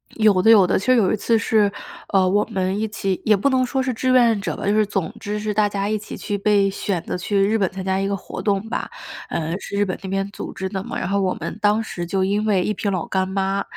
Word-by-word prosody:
有 210 -4 +4
的 220 - +4
有 210 -4 +8
的， 180 - +1
其 200 - -7
实 255 0 +5
有 205 -6 +3
一 - - +2
次 230 +2 +2
是， 210 -1 +2 0.4
呃， 190 -1 +4
我 205 +3 +3
们 190 +1 -2
一 220 - 0
起 195 -3 -3
也 215 -1 +5
不 240 +9 +1
能 255 -1 +2
说 265 +1 -1
是 255 -1 -1
志 255 +3 0
愿 235 -4 +4
者 195 - -3
吧， - - -6
就 205 - +2
是 215 0 +3
总 195 -1 -3
之 210 0 -3
是 210 0 -2
大 210 0 +3
家 200 0 -2
一 215 - +1
起 210 - -8
去 205 -2 -3
被 200 -1 +3
选 190 -3 -3
择 - - -4
去 200 +3 -2
日 220 +2 +2
本 195 -3 +1
参 190 0 -6
加 190 0 0
一 195 - 0
个 200 - -1
活 - - -7
动 200 0 0
吧。 - - -3 0.4
呃， 160 0 -2
是 - - -7
日 205 - +2
本 185 -2 -3
那 190 - -6
边 195 0 -1
组 - - -7
织 190 0 -4
的 190 -2 -3
嘛， - - -5
然 185 - -3
后 200 0 +1
我 185 -1 +1
们 - - -6
当 210 +2 +3
时 175 -5 -5
就 190 +2 0
因 205 +3 0
为 195 -4 +2
一 210 - 0
瓶 205 - -2
老 185 -4 -2
干 190 -1 -1
妈， 195 +1 -1
200 Hz, 310 characters per minute, -21 LUFS, 190-215 Hz, 0.4 s, 有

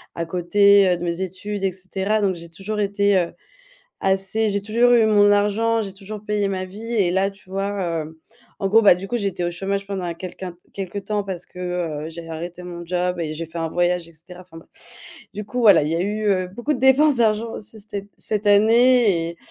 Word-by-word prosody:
à 170 - -3
côté, 195 +3 +4
heu, 180 - +2
de 170 - -7
mes 170 +1 -2
études 190 +2 -5
et 190 - +1
cetera, 190 +3 -2
donc 195 -2 +1
j'ai 170 0 -11
toujours 195 +5 -5
été, 200 -1 +2
heu, 175 -2 -1 0.7
assez 195 +3 +1
j'ai 200 0 -1
toujours 235 +4 +3
eu 230 -2 +5
mon 205 -1 +5
argent. 210 +3 +2
J'ai 195 -3 -5
toujours 205 +1 -8
payé 210 -1 -1
ma 185 -1 -3
vie 215 +5 -8
et 195 -6 +2
là, 190 +2 +1
tu 195 -1 -21
vois, 195 +1 -2 0.3
hem, 155 +1 -10 0.4
en 195 - -1
gros, 220 +3 +6
bah, 205 -5 +7
du 180 +2 -7
coup, 240 +4 -2
j'étais 195 -4 -2
au 175 - 0
chômage 195 +3 -3
pendant 195 -2 -4
un 170 -1 -3
quelqu'un 180 +1 -7 0.2
quelque 195 0 -5
temps 205 +1 -2
parce 185 -3 -5
que, - - -15 0.5
heu, - - -6
j'ai 165 0 -9
arrêté 170 +2 -7
mon 175 -1 -8
job 180 0 -1
et 155 -2 -3
j'ai 160 +2 -5
fait 165 +1 -8
un 165 0 -1
voyage 175 0 0
et - - -17
cetera. 175 +3 -13
Enfin, 180 -2 -16
bref. 165 - -17 0.7
Du 210 - -5
coup, 250 +4 -6
voilà, 200 -9 +7
il 150 - -1
y 160 - -1
a - - -1
eu, 210 +3 -2
heu, 185 -2 +1
beaucoup 240 +10 -3
de 270 - -3
dépenses 270 +3 +5
d'argent, 225 -1 +1
aussi 215 +1 -9
cet 200 -1 -7
cette 210 0 -3
année 215 -4 +4
et 170 - -11
195 Hz, 230 wpm, -22 LUFS, 175-210 Hz, 0.7 s, bah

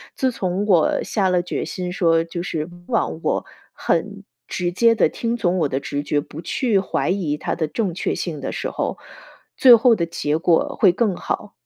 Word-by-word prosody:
自 260 -1 +1
从 190 -3 -2
我 180 -7 +3
下 195 -4 0
了 180 -1 +2
决 175 - -4
心 180 -1 -4
说， 165 -3 +2
就 170 +1 -6
是 155 -3 -3 0.2
忘 225 -8 -1
我- - - 0 0.3
很 200 +4 -2 0.2
直 175 -1 -2
接 230 +5 +4
地 - - +4
听 235 0 -2
从 180 -3 +1
我 155 -4 +1
的 135 - -1
直 140 +1 -3
觉， 145 0 0
不 145 +2 -8
去 220 +3 +1
怀 190 - -1
疑 175 -6 -1
它 - - -3
的 160 - -1
正 190 +2 -2
确 175 - -2
性 155 -5 -4
的 - - -3
时 - - -3
候， - - -3 0.6
最 255 -3 +8
后 235 +1 +4
的 170 -5 -1
结 155 -2 -1
果 170 -1 +1
会 195 - +6
更 205 +1 0
好。 205 +3 -4
180 Hz, 215 characters per minute, -21 LUFS, 165-210 Hz, 0.6 s, 最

